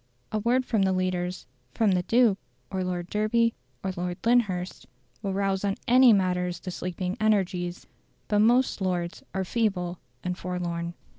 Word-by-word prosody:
A 215 - 0
word 245 +4 +2
from 220 -5 +1
the 190 -1 +3
leaders, 185 -1 -1 0.3
from 220 -3 +3
"the 180 -1 +2
Duke," 225 0 +3 0.3
or 190 -1 -1
Lord 175 -1 -3
Derby, 225 +2 +2 0.3
or 190 - -1
Lord 175 -1 -3
Lyndhurst, 190 - +1 0.3
will 200 - -2
rouse 195 -1 0
on 200 0 0
any 250 0 +7
matters 180 -3 +1
the 185 - -6
sleeping 180 +1 -3
energies; 185 -4 0 0.4
but 210 -1 +2
most 240 +1 +3
Lords 180 -2 -2
are 190 0 0
feeble 185 -5 -1 0.2
and 180 0 -2
forlorn. 175 -2 -3
190 Hz, 155 wpm, -27 LUFS, 180-215 Hz, 0.4 s, any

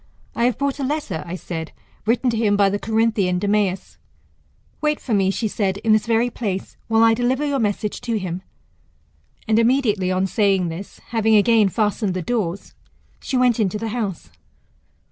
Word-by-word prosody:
I 235 - +1
have 245 - +1
brought 280 0 -1
a - - -2
letter, 285 - -2
I 170 - -4
said, 165 -3 -6 0.3
written 245 +2 +2
to 230 - -2
him 210 -2 +2
by 200 -1 +4
the 205 - -1
Corinthian 220 -5 +1
Demeas. 200 -1 -1 0.8
Wait 300 -1 +1
for 240 - -3
me, 195 -2 +3
she 220 +3 -1
said, 195 -2 -1
in 215 +1 +2
this 215 0 +2
very 235 +1 +2
place, 200 -5 -4
while 225 0 +3
I 225 0 +6
deliver 250 +5 0
your 285 -2 0
message 210 -1 -2
to 230 -2 -1
him. 185 -2 -4 1.1
And 220 0 +3
immediately 225 -6 +2
on 185 +1 +1
saying 195 -3 +1
this, 170 +5 -8
having 220 -1 +2
again 215 -1 +4
fastened 210 -1 0
the 185 - -2
doors, 200 -4 -3 0.5
she 265 - -2
went 250 -2 +3
into 210 -1 +1
the 225 +1 -4
house. 200 - -4
215 Hz, 180 wpm, -21 LUFS, 195-235 Hz, 1.1 s, I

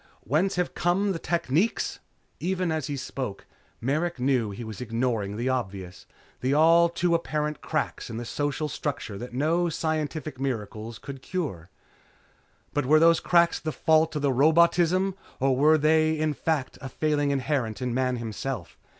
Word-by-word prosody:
Whence 165 - +1
have 180 0 -1
come 190 +4 +1
the 170 - -3
techniques?" 170 - 0 0.4
Even 185 -1 -1
as 155 -4 -2
he 145 - -3
spoke, 130 -5 -5 0.3
Merrick 155 +5 -1
knew 125 -4 +1
he 100 +4 -6
was 110 -2 -7
ignoring 115 -4 -1
the 120 +3 -2
obvious, 95 -8 -4 0.3
the 130 +2 +1
all 165 +2 +6
too 170 0 0
apparent 150 -3 -1
cracks - - -2
in 115 - -5
the 120 - -5
social 145 +4 -2
structure 145 -6 -4
that 125 - -7
no 165 +5 +1
scientific 155 -2 -3
miracles 115 -3 -4
could 135 -2 -9
cure. 130 - -4 1.0
But 145 -3 0
were 155 +2 +6
those 165 +1 +5
cracks 170 -1 +3
the 155 - -3
fault 160 +1 +2
of 150 - -2
robotism 170 +7 +4 0.3
or 135 0 +2
were 155 +4 +5
they 155 +1 +3
in 155 0 0
fact 150 -2 -2
a 135 - -6
failing 145 +1 0
inherent 135 -5 -1
in 125 -2 -2
Man 130 0 +1
himself? 115 - -5
145 Hz, 160 wpm, -26 LUFS, 125-160 Hz, 1.0 s, all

